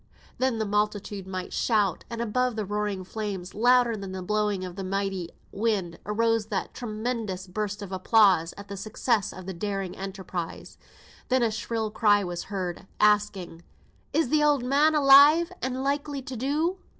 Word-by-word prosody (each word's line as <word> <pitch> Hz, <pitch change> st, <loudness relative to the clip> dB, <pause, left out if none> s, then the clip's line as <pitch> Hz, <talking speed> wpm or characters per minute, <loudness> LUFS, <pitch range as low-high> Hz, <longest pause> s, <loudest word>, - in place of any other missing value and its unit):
Then 255 Hz, -2 st, +1 dB
the 220 Hz, -, -1 dB
multitude 205 Hz, -1 st, -1 dB
might 185 Hz, -1 st, -5 dB
shout; 205 Hz, -6 st, +1 dB
and 235 Hz, -1 st, -4 dB
above 250 Hz, +2 st, 0 dB
the 215 Hz, -2 st, -2 dB
roaring 205 Hz, -1 st, -2 dB
flames, 190 Hz, -2 st, -5 dB
louder 245 Hz, +1 st, +4 dB
than 195 Hz, -2 st, -7 dB
the 185 Hz, -1 st, -5 dB
blowing 210 Hz, -1 st, 0 dB
of 180 Hz, -1 st, -8 dB
the 195 Hz, -, -5 dB
mighty 195 Hz, -2 st, -2 dB, 0.2 s
wind, 200 Hz, -5 st, -1 dB
arose 225 Hz, 0 st, +1 dB
that 205 Hz, -3 st, -3 dB
tremendous 215 Hz, -4 st, -4 dB
burst 205 Hz, +2 st, -4 dB
of 195 Hz, -, -8 dB
applause 190 Hz, -3 st, +4 dB
at 200 Hz, 0 st, -9 dB
the 200 Hz, 0 st, -7 dB
success 215 Hz, +1 st, 0 dB
of 185 Hz, -, -10 dB
the 190 Hz, -, -5 dB
daring 195 Hz, 0 st, -3 dB
enterprise. 190 Hz, -3 st, -6 dB, 0.5 s
Then 255 Hz, -1 st, +3 dB
a 230 Hz, -, +2 dB
shrill 220 Hz, 0 st, -3 dB
cry 205 Hz, -2 st, +3 dB
was 175 Hz, -1 st, -4 dB
heard, 190 Hz, -2 st, -4 dB
asking 205 Hz, -5 st, +2 dB, 0.5 s
"Is 320 Hz, -6 st, +1 dB
the 305 Hz, +1 st, +3 dB
oud 295 Hz, -4 st, +3 dB
man 290 Hz, +5 st, +3 dB
alive, 295 Hz, +4 st, +7 dB
and 260 Hz, +1 st, -2 dB
likely 285 Hz, 0 st, -2 dB
to 260 Hz, -, -6 dB
do?" 305 Hz, -, -1 dB
210 Hz, 165 wpm, -26 LUFS, 190-245 Hz, 0.5 s, alive